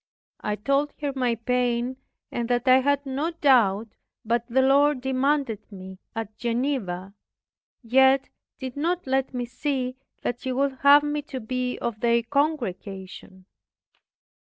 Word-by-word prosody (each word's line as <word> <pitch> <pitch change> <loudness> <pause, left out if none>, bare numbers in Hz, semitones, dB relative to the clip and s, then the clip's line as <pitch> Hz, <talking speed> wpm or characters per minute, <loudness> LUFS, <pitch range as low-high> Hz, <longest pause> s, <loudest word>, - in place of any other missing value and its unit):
I 210 - -2
told 275 +7 0
her 290 -2 -2
my 250 -3 +1
pain, 245 +1 0 0.3
and 235 0 -3
that 245 +1 0
I 255 0 +8
had 285 +1 +1
no 275 +4 -1
doubt 230 - +3 0.4
but 235 +1 +1
the 260 +2 +2
Lord 280 +1 +4
demanded 265 -3 -1
me 190 -1 -10 0.2
at 220 -1 -5
Geneva, 230 -7 -2 0.7
yet 265 +3 +4 0.3
did 260 -2 -6
not 340 +5 -1
let 265 0 0
me 250 -2 -3
see 255 0 -3 0.3
that 245 - -2
He 260 - -2
would 270 0 0
have 285 +1 +7
me 295 0 -1
to 265 -4 -4
be 250 +2 -3
of 235 -3 -4
their 235 0 +2
congregation. 195 - -3
255 Hz, 140 wpm, -25 LUFS, 230-275 Hz, 0.7 s, I